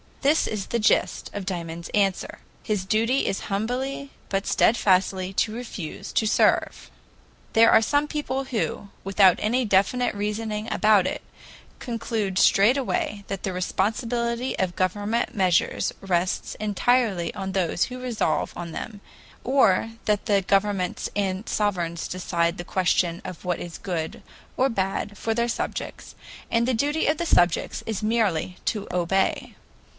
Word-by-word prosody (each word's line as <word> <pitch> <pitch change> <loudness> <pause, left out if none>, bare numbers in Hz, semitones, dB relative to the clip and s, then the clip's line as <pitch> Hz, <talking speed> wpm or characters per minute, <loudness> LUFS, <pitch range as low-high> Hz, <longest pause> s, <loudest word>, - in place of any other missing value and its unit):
This 290 +4 +3
is 210 -3 -3
the 235 - -1
gist 210 - +1
of 205 -2 -5
Dymond's 170 -3 -5
answer: 195 -2 0 0.2
"His 210 -3 -1
duty 230 +6 +1
is 195 - -1
humbly 255 +7 -2 0.2
but 195 0 -1
steadfastly 190 -3 +2
to 215 +2 0
refuse 220 -9 -6
to 220 - +2
serve." - - +2 0.6
There 230 0 +6
are 225 - +6
some 290 +5 +1
people, 275 -3 -3
who, 220 -4 -3
without 195 -2 +5
any 245 +4 +1
definite 205 +5 +2
reasoning 210 +1 -3
about 210 -3 +4
it, - - -2 0.6
conclude 225 -5 -2
straightway 210 -2 +2
that 195 -1 -5
the 190 - -2
responsibility 235 +6 -1
of 185 -2 -1
government 205 +6 -1
measures 185 -4 +2
rests 185 -1 -1
entirely 215 -3 +1
on 190 -1 -4
those 180 -2 +1
who 255 0 -7
resolve 245 -3 -1
on 170 -1 -6
them, 205 +4 -7 0.4
or 225 -5 +3
that 210 -1 +1
the 200 -2 +3
governments 195 -1 0
and 195 0 -1
sovereigns 175 -5 -1
decide 170 -2 -1
the 175 - -5
question 180 -1 +1
of 180 - -8
what 180 -1 -1
is 175 -1 -7
good 165 -4 -4 0.3
or 260 - +4
bad 200 -1 -2
for 225 - -1
their 235 +1 0
subjects, - - -4 0.4
and 235 +1 +2
the 260 - +2
duty 290 +7 0
of 305 +1 +2
the 340 - -2
subjects 175 - +2
is 220 -2 -3
merely 205 -6 0
to 210 -2 -1
obey. 180 +2 0
205 Hz, 145 wpm, -25 LUFS, 185-235 Hz, 0.6 s, There